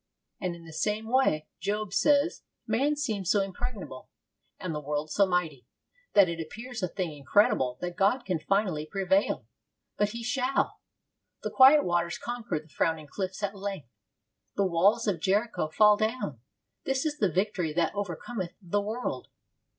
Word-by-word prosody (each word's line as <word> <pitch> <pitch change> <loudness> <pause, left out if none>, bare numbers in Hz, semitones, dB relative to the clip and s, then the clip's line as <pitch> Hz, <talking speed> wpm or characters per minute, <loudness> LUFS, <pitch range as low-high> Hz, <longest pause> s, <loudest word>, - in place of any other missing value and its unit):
And 180 -2 -2
in 170 -1 -13
the 160 - -11
same 210 +6 -1
way, 250 -13 +2
Job 205 +2 -2
says, 290 +6 +3 0.2
man 270 +7 +1
seems 215 -11 -2
so 205 - +4
impregnable, 195 - -5 0.5
and 180 -3 -4
the 150 - -2
world 150 +1 -3
so 200 +4 +4
mighty, 165 -8 -1 0.5
that 200 -2 +7
it 170 0 -4
appears 235 +8 -7
a 185 - +1
thing 175 -4 -4
incredible 135 -4 +2
that 175 -1 -4
God 240 +6 +2
can 180 -4 -1
finally 185 -4 0
prevail. 195 +2 +1 0.5
But 205 0 +2
He 235 +2 -6
shall. 255 +2 0 0.6
The - - -2
quiet 275 +3 +7
waters 175 0 0
conquer 235 -8 -3
the 155 - -17
frowning 160 0 -1
cliffs 190 +1 -4
at 200 0 -1
length. 195 - -5 0.7
The 200 - +2
walls 190 +6 +3
of 200 -6 0
Jericho 200 +1 +1
fall 210 +5 +5
down. 215 - -2 0.4
This 270 +2 -1
is 300 -1 -2
the 200 -5 +2
victory 185 -2 0
that 165 0 +1
overcometh 195 0 -4
the 205 +1 -1
world. 220 +5 -4
195 Hz, 160 wpm, -28 LUFS, 170-220 Hz, 0.7 s, that